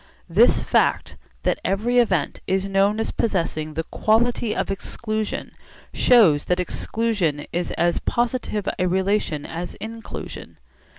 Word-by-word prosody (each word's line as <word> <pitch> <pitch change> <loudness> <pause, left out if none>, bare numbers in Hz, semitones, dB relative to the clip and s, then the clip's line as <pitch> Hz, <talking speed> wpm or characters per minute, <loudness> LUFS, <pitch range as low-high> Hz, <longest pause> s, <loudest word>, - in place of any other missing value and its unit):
This 205 +8 +4
fact, - - +1 0.3
that - - 0
every 230 +6 +1
event 185 -11 +1
is 190 0 +1
known 195 +2 +2
as 225 - -1
possessing 160 -7 -1
the 160 - -1
quality 225 +3 +1
of - - -1
exclusion, 215 +2 -3 0.4
shows 195 - +5
that 180 0 +1
exclusion 180 -5 -1
is 175 +1 -1
as 175 0 +1
positive 235 -4 -1
a 180 - +2
relation 190 -5 0
as 170 +2 -6
inclusion. 225 +1 -8
195 Hz, 125 wpm, -23 LUFS, 175-225 Hz, 0.4 s, shows